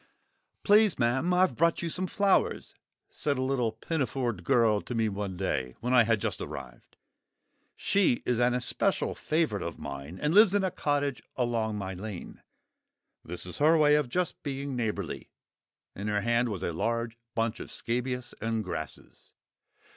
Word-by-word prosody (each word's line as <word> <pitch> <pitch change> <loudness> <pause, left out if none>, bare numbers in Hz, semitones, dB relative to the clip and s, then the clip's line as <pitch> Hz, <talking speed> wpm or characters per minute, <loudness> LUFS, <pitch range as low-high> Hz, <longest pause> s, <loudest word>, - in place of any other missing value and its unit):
"Please, 210 -2 +5
ma'am, 130 +8 +1
I've 180 -7 +3
brought 170 +4 +2
you 170 - -1
some 185 +2 -1
flowers," 200 +1 +1 0.4
said 145 -2 -1
a 130 - 0
little 130 -4 0
pinafored 120 - -2
girl 110 +1 +3
to 125 - -6
me 115 -1 +2
one 100 -2 -4
day, 65 -9 -2
when 125 +3 -1
I 120 -3 +6
had 115 -1 +2
just - - -3
arrived. 60 -3 -9 0.8
She 195 -11 +2
is 125 -1 +1
an 120 0 +3
especial 125 0 0
favourite 155 -10 0
of 85 0 -5
mine, 70 +5 -7
and 150 +2 0
lives 205 0 +7
in 200 - +2
a 190 - 0
cottage 145 -6 -1
along 115 -3 0
my 95 -2 -4
lane. 95 0 -7 0.8
This 90 +2 -6
is 90 - -8
her 155 +3 +5
way 150 -1 +5
of 150 -4 +2
just 180 +4 -1
being 140 -2 -4
neighbourly. 105 -7 -3 0.7
In 100 +2 -5
her 105 -1 +1
hand 120 +2 +2
was 95 -4 -4
a 85 - -1
large 115 +6 -1 0.2
bunch 115 0 0
of - - -7
scabious 125 +1 -3
and 115 -1 -1
grasses. 85 -5 -8
120 Hz, 165 wpm, -29 LUFS, 105-145 Hz, 0.8 s, lives